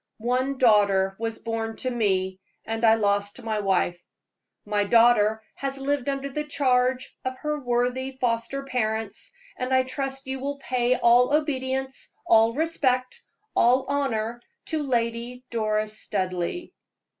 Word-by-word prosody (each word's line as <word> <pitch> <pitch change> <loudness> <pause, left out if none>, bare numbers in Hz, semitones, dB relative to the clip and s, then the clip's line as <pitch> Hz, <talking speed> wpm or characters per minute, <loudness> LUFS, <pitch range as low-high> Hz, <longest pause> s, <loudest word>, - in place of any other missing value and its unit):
One 255 +4 0
daughter 200 -5 +4
was 225 0 -3
born 225 -1 -3
to 255 - -2
me, 190 -5 0 0.3
and 225 +1 -3
I 225 -1 +7
lost 205 -1 0
my 220 -1 -1
wife. 180 -3 0 0.6
My 205 0 +1
daughter 220 0 +4
has 275 0 -4
lived 280 0 -1
under 275 0 -2
the 300 +2 -3
charge 255 -3 +1
of 260 0 -3
her 300 +1 -2
worthy 250 +2 -1
foster 240 +3 -1
parents, 220 -5 -2 0.3
and 255 +1 -3
I 260 0 +4
trust 270 +1 -4
you 265 0 -3
will 280 +2 -3
pay 255 -2 +1
all 245 +2 +4
obedience, 265 -3 -2
all 225 +1 +4
respect, 265 -5 0 0.3
all 255 +3 +4
honor 240 -5 -1 0.3
to 315 -3 -1
Lady 240 -1 -2
Doris 215 -1 0
Studleigh." 185 - -3
245 Hz, 135 wpm, -25 LUFS, 220-265 Hz, 0.6 s, I